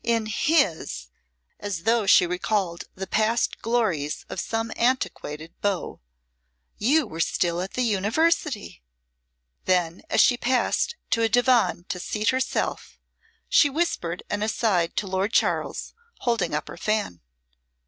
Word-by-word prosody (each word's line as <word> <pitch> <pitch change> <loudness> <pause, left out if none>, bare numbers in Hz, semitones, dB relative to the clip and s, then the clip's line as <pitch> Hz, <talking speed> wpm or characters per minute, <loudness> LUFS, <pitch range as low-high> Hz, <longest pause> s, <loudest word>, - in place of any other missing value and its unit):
In 230 -1 +1
his 210 - 0 0.2
" - - -50 0.3
(as 195 -5 -4
though 225 -2 +2
she 180 - +7
recalled 180 0 -1
the 190 - -5
past 220 +4 0
glories 210 -11 -1
of - - -5
some 225 +2 -2
antiquated 165 - -1
beau) 200 - -2 0.8
"you 285 +7 +3
were 165 -7 -9
still 170 +1 0
at 190 - -5
the 255 - 0
University." 225 - 0 0.8
Then 180 -2 +1
as - - +1
she 245 - +5
passed 260 - +1 0.2
to 230 - +2
a 225 - +3
divan 245 -6 +3
to 180 - -3
seat 210 +4 -1
herself 260 0 -2 0.5
she 290 - +5
whispered 265 - -2
an 205 - -2
aside 210 -6 +1
to - - 0
Lord 190 +3 -1
Charles, - - 0 0.3
holding 225 - 0
up 150 - -3
her - - -9
fan. 210 - -1
210 Hz, 140 wpm, -25 LUFS, 180-240 Hz, 0.8 s, she